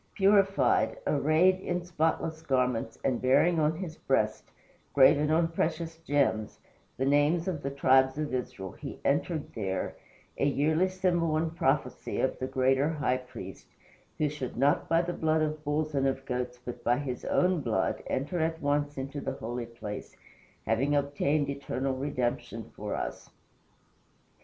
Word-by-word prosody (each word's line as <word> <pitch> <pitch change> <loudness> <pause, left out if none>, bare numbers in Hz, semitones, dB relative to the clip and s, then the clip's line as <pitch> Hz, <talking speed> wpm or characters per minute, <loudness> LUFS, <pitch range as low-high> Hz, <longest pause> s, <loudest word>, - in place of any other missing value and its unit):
Purified, 195 - +3
arrayed 155 +6 +3
in 180 -2 -3
spotless 160 -1 -1
garments, 125 -5 0
and 130 -3 +1
bearing 145 +7 +4
on 155 +1 +2
his 165 -2 -6
breast 110 -5 0 0.5
graven 145 +2 +6
on 165 +1 +3
precious 165 0 -2
gems 140 -9 0 0.4
the 130 - 0
names 145 +5 +3
of 170 -6 -2
the 140 - -2
tribes 130 0 +3
of 150 -3 -3
Israel, 95 -7 -4
he - - -8
entered 145 +2 0
there, 95 -4 -3 0.4
a - - +2
yearly 155 +6 +2
symbol 175 -4 +1
and 160 +1 -1
prophecy 135 -6 0
of 130 - 0
the 130 - -2
greater 130 +2 +2
High 145 -5 0
Priest, 125 -7 -10 0.5
who 150 - +2
should 145 -5 -5
"not 140 +3 +2
by 165 +1 +3
the 175 0 -3
blood 160 -1 +1
of 155 0 -3
bulls 150 +1 -1
and 135 -1 +2
of 135 0 -2
goats, 125 -1 -3
but 120 - -7
by 120 +1 +3
his 130 -4 -4
own 180 -3 +2
blood, - - 0
enter 150 +7 -2
at 160 0 0
once 145 -1 0
into 140 +2 -4
the - - -3
holy 120 +1 -5
place, 105 -3 -8 0.5
having 135 +6 +1
obtained 145 +1 +1
eternal 135 -1 -2
redemption 130 -3 -3
for - - -4
us." - - -5
145 Hz, 155 wpm, -29 LUFS, 130-160 Hz, 0.5 s, graven